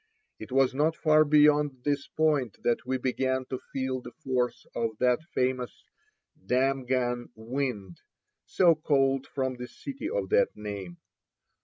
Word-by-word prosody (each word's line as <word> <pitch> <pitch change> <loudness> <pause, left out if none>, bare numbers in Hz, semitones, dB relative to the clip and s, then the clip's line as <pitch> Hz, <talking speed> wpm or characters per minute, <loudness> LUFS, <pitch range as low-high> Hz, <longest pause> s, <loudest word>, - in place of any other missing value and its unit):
It - - -9
was 135 0 +3
not 155 +4 +1
far 155 -2 +4
beyond 150 -3 +3
this 145 0 -1
point 150 -8 0
that 120 +1 0
we 130 0 0
began 130 0 -1
to 130 - -2
feel 130 -1 -2
the - - -10
force 125 -2 -1
of 115 -2 -2
that 125 +2 +3
famous 125 -1 -1 0.6
"Damghan 125 0 0
wind," 110 -5 -4 0.5
so 175 -3 +4
called 135 -3 +1
from 130 -2 -2
the 125 0 -6
city 280 - -6
of - - -2
that 485 +2 +2
name. 100 -4 -6
130 Hz, 140 wpm, -28 LUFS, 125-145 Hz, 0.6 s, far